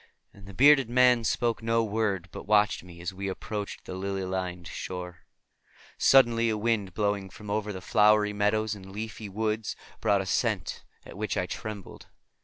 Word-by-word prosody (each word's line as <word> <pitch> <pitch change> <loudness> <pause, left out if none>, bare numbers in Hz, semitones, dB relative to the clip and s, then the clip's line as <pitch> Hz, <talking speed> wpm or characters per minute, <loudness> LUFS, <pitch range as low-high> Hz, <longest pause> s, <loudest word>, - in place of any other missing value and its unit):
And 100 -1 -15
the 100 - -10
bearded 135 -1 +6
man 125 -1 +4
spoke 115 +1 0
no 115 0 +2
word, 105 -4 -1
but - - -9
watched 105 -2 +3
me 85 -1 -12
as 90 +2 -4
we 100 +1 -5
approached 105 +2 -5
the - - -6
lily 95 +1 -3
lined 90 -2 -4
shore. 90 -2 -6 0.8
Suddenly 115 -3 +5
a 110 - 0
wind 105 -3 -1
blowing 100 -2 -1
from 105 +1 -9
over 105 0 -1
the 95 -2 -7
flowery 105 +1 +4
meadows 105 +1 +1
and 95 -2 -10
leafy 110 0 -6
woods 110 +2 -2 0.2
brought 100 -1 +2
a - - -5
scent 90 - -1 0.2
at - - -11
which - - -2
I - - +1
trembled. 105 -3 -7
105 Hz, 175 wpm, -28 LUFS, 95-110 Hz, 0.8 s, bearded